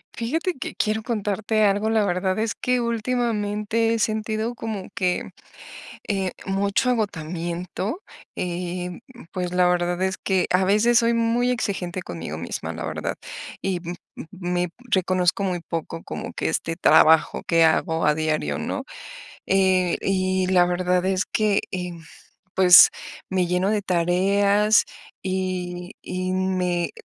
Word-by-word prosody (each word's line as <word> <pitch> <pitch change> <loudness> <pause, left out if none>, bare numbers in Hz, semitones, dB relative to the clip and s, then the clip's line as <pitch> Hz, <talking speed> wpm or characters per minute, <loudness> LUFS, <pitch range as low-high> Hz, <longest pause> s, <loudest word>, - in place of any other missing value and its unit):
Fíjate 320 +10 -1
que - - -5
quiero 220 0 0
contarte 215 -1 0
algo, 205 +2 +2
la 220 -1 +3
verdad 185 +1 0
es 225 0 0
que 250 -1 0
últimamente 225 -2 0
he 230 - -1
sentido 220 +1 -1
como 220 -4 -5
que, 180 -1 -1 0.8
eh, 195 -3 -1
mucho 200 +5 +1
agotamiento, 180 - -3 0.3
eh, 180 0 -3
um, 180 - -9
y 250 - -14
pues 180 -1 -3
la 180 0 +4
verdad 175 0 0
es 190 0 0
que 190 -2 +1
a 185 +1 +3
veces 215 +5 +4
soy 235 0 +2
muy 230 +1 +1
exigente 190 -6 -2
conmigo 80 -3 -6
misma, 85 - -5
la - - -5
verdad - - -3 0.5
y 190 -2 -1
m 175 0 -6 0.2
m - - -7
me 180 -2 -2 0.2
reconozco 185 -1 +1
muy 180 -2 -1
poco 165 0 -5
como - - -6
que - - -2
este 165 0 -1
trabajo 160 -1 +5
que 165 -1 +4
hago 160 0 +1
a 150 0 +3
diario, 155 - -1
¿no?, - - -3 0.6
eh, 185 -2 +3
y 185 -1 0
la 180 -1 +5
verdad 180 0 +1
es 190 0 +1
que, 210 -2 +1
em, 180 -3 -5 0.5
pues, 180 -2 +9 0.4
me 185 -1 +1
lleno 180 +3 +1
de 210 -1 0
tareas 200 +4 +3 0.4
y 185 -1 -3
y 185 0 -3
me 185 -2 0
eh, - - -10
185 Hz, 145 wpm, -23 LUFS, 180-215 Hz, 0.8 s, pues